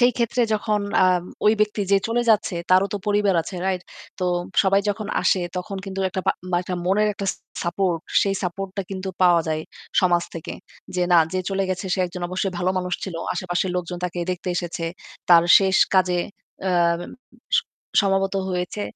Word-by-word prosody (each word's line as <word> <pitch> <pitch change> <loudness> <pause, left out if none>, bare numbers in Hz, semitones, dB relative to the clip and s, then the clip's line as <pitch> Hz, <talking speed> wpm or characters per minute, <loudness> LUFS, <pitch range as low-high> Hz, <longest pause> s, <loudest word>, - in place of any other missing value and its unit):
সেই 245 0 +5
ক্ষেত্রে 240 +1 +1
যখন 210 0 0 0.2
আম 180 -1 +2 0.2
ওই 215 - +7
ব্যক্তি 210 -1 +1
যে 195 - +6
চলে 240 +1 +1
যাচ্ছে 210 -3 +2 0.2
তারও 185 +1 +5
তো - - -1
পরিবার 205 -2 +2
আছে, 180 +2 -7
right? 185 -2 -1 0.4
তো 185 - -1 0.4
সবাই 195 0 +3
যখন 205 0 -4 0.2
আসে 190 - +3 0.2
তখন 190 +2 -4
কিন্তু 195 0 -4
একটা 190 - -2
পা - - +4 0.2
বা - - +3
একটা 180 0 -4
মনের 210 +3 +3
একটা 200 0 -4 0.4
support, 175 0 0 0.2
সেই 195 -1 +1
support 190 +2 -3
টা 200 - -1
কিন্তু 190 0 -4
পাওয়া 175 -2 +6
যায় 155 0 -1 0.4
সমাজ 175 -2 +3
থেকে। 165 - -6 0.4
যে 180 - +2
না, 175 - +8
যে 185 - 0
চলে 195 0 0
গেছে 185 +2 -3
সে - - -5
একজন 175 +1 -8
অবশ্যই 185 +1 -2
ভালো 180 +1 +1
মানুষ 180 -1 -2
ছিল। 190 - -6 0.2
আশেপাশের 180 0 -1
লোকজন 180 0 -4
তাকে 180 0 -3
দেখতে 180 0 -6
এসেছে, 170 -1 -3 0.4
তার 170 -1 +8 0.2
শেষ 195 -1 +2 0.2
কাজে 180 -1 +3 0.5
অ্যাম 170 -2 +2 0.6
স - - +4 0.4
সমবেত 195 0 +1 0.2
হয়েছে। 180 +3 -3
185 Hz, 185 wpm, -23 LUFS, 180-195 Hz, 0.6 s, না